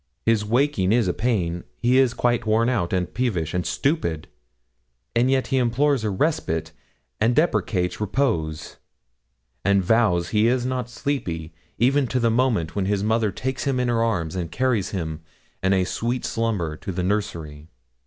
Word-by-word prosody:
His 115 -2 +3
waking 115 -3 +1
is 115 -3 +3
a 90 - +1
pain; 90 -8 -1
he 125 +2 +3
is 130 -3 +3
quite 120 -2 +1
worn 115 +2 +3
out, 105 -9 0
and 90 -1 -1
peevish, 95 -11 -1
and 90 -1 0
stupid, 85 - -1 0.9
and 120 +2 +3
yet 135 -1 +2
he - - +4
implores 130 +2 +2
a 110 - 0
respite, 90 - -1 0.5
and 115 +3 +2
deprecates 105 - +1
repose, 90 - -1 0.9
and 100 -1 +3
vows 90 -6 +2
he 105 +1 +3
is 125 0 +1
not 125 -2 -2
sleepy, 90 - -3 0.2
even 135 +3 +3
to 130 - 0
the 115 -1 +2
moment 115 -9 +1
when 100 -2 0
his 100 -1 0
mother 110 -1 +1
takes 130 +4 -3
him 135 -2 +1
in 125 -1 +1
her 115 -1 +1
arms, 90 -8 -1
and 85 -3 -3
carries 125 -7 0
him, 80 -5 -4 0.4
in 95 +1 +2
a 95 -1 +3
sweet 120 +6 -2
slumber, 105 -9 -1
to 95 - -6
the 90 0 -2
nursery. 85 -7 -3
110 Hz, 170 wpm, -23 LUFS, 90-125 Hz, 0.9 s, he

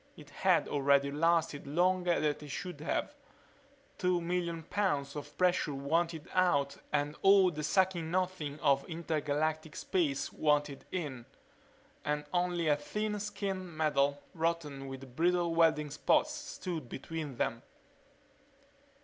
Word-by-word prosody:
It - - -13
had - - +2
already 140 0 +3
lasted 160 -1 +1
longer 180 +3 +2
than 150 -1 +1
it 150 - -9
should 175 +2 -5
have. 155 - -1 0.9
Two 180 -2 +2
million 170 -1 -2
pounds 145 -7 -1
of 145 - -8
pressure 180 -5 +2
wanted 160 +3 -1
out 140 -7 +2
and 145 0 0
all 195 -2 +6
the 155 -2 -5
sucking 175 0 +1
Nothing 175 -5 -1
of 140 0 +3
intergalactic 155 -1 -1
space 145 -7 -1
wanted 145 -2 +1
in. 140 -10 -4 0.8
And 150 0 -1
only 175 -2 +1
a 145 -1 +4
thin 210 +7 -3
skin 200 -2 -3
of 185 - -7
metal, 145 -2 +1
rotten 160 -5 -2
with 135 -1 -9
brittle 175 +1 +2
welding 160 -3 +3
spots, 305 - +2
stood 185 - -5
between 150 +1 -5
them. 115 0 -1
160 Hz, 130 wpm, -32 LUFS, 145-180 Hz, 0.9 s, all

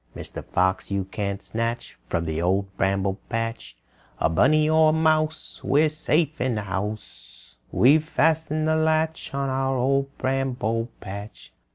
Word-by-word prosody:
"Mr. - - -7
Fox, 95 +1 0
you 100 -1 -1
can't 100 +1 -4
snatch 115 +1 -3
From 85 0 -1
the 80 0 -2
Old 95 +2 0
Bramble 95 0 0
Patch 115 - -4 0.4
A - - +2
bunny 150 - +4
or 155 0 +5
mouse. 155 0 0
We're 155 +2 +3
safe 155 0 0
in 130 -2 +1
the 105 - -2
house; 95 - -6 0.2
"We've 150 +5 +5
fastened 155 -1 +1
the 160 - +3
latch 160 0 0
On 140 0 -1
our 135 0 0
Old 135 +2 +1
Bramble 125 -3 -1
Patch!" 100 +2 -9
125 Hz, 145 wpm, -24 LUFS, 100-155 Hz, 0.4 s, or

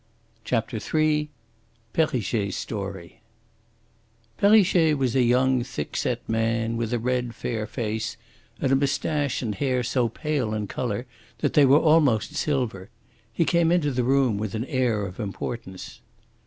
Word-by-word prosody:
CHAPTER 115 -1 -1 0.2
III 150 -1 +2 0.6
PERRICHET'S 120 - 0
STORY 100 -4 -6 1.2
Perrichet 190 -6 +5
was 130 -3 0
a 130 - +4
young, 125 +1 +3
thick 75 -11 -6
set - - -2
man, 115 0 0
with 115 -1 -2
a 120 - +1
red, 125 0 -1
fair 110 -3 -3
face, 110 -1 -3 0.4
and 135 - 0
a - - +5
moustache 140 0 0
and 110 -3 -2
hair 130 +1 0
so 120 0 +1
pale 135 -4 -2
in 105 -1 -2
colour 115 +2 -3 0.3
that - - -1
they 145 -2 +6
were 135 +2 +7
almost 150 -6 +3
silver. 125 -11 -1 0.4
He 165 +9 +1
came 170 -1 +3
into 165 -5 +2
the 125 -1 0
room 130 -4 +2
with 110 -1 -3
an 110 +3 -2
air 120 -6 0
of 90 +2 -8
importance. 100 -2 -6
125 Hz, 145 wpm, -25 LUFS, 110-140 Hz, 1.2 s, were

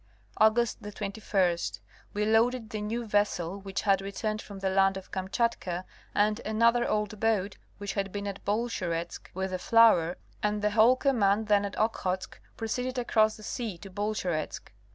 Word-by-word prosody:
August 220 +2 +3
21, 200 -3 -1 0.6
we 210 0 +1
loaded 225 +1 +2
the 215 - -3
new 230 +3 -3
vessel 200 -3 0
which 195 -1 -4
had 195 -2 +3
returned 215 +2 -3
from 200 - -10
the 190 0 -1
land 195 0 +3
of 190 - -10
Kamchatka, 190 -2 -1 0.3
and 210 +1 +2
another 230 +2 +3
old 210 0 -1
boat 210 -3 +1 0.2
which 205 -1 -4
had 195 -1 -2
been 205 +1 -4
at 200 -1 -5
Bolsheretsk, 190 -6 -2
with 190 0 -2
the 185 - -2
flour, 185 -6 +5 0.2
and 210 0 0
the 210 - +2
whole 225 +4 +6
command 220 -6 +2
then 205 -1 +4
at 200 - -6
Okhotsk 190 -4 -1 0.2
proceeded 250 +3 -2
across 220 -3 +2
the 215 - -13
sea 220 -5 -4
to 195 +3 -11
Bolsheretsk. 185 -5 -3
210 Hz, 160 wpm, -29 LUFS, 195-220 Hz, 0.6 s, whole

